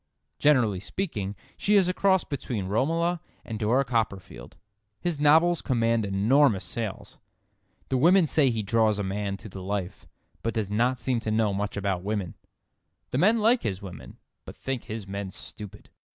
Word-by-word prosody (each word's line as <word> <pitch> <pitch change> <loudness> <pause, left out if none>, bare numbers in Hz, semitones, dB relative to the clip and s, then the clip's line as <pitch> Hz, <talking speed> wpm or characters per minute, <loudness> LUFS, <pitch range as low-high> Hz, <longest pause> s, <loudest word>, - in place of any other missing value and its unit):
Generally 125 -10 +3
speaking, 105 - -4 0.2
she 210 - +2
is 195 -3 +5
a 180 - +1
cross 190 -2 +3
between 125 -7 -4
Romola 165 - 0 0.2
and 110 -1 -5
Dora 120 +6 +2
Copperfield. 105 - -3 0.4
His 175 -4 -2
novels 160 +4 +4
command 115 -3 +1
enormous 105 +3 +3
sales. 110 -4 -5 0.7
The 130 - +1
women 175 +5 +5
say 150 -3 +3
he 115 -3 -1
draws 110 0 +2
a 105 - -2
man 100 0 -3
to 110 - -11
the 95 -2 -9
life, 95 -1 -4 0.3
but 115 0 -2
does 105 -3 -2
not 120 +4 +1
seem 125 0 0
to 110 - -4
know 110 -2 +1
much 100 +1 -3
about 100 -3 -1
women. 100 -3 -3 0.8
The 130 - 0
men 220 +6 +4
like 230 +3 +4
his 100 -1 -3
women, 90 -3 -10 0.3
but - - -11
think 135 -3 -4
his 110 -2 -6
men 100 0 -4
stupid. 105 +2 -10
115 Hz, 165 wpm, -26 LUFS, 100-145 Hz, 0.8 s, is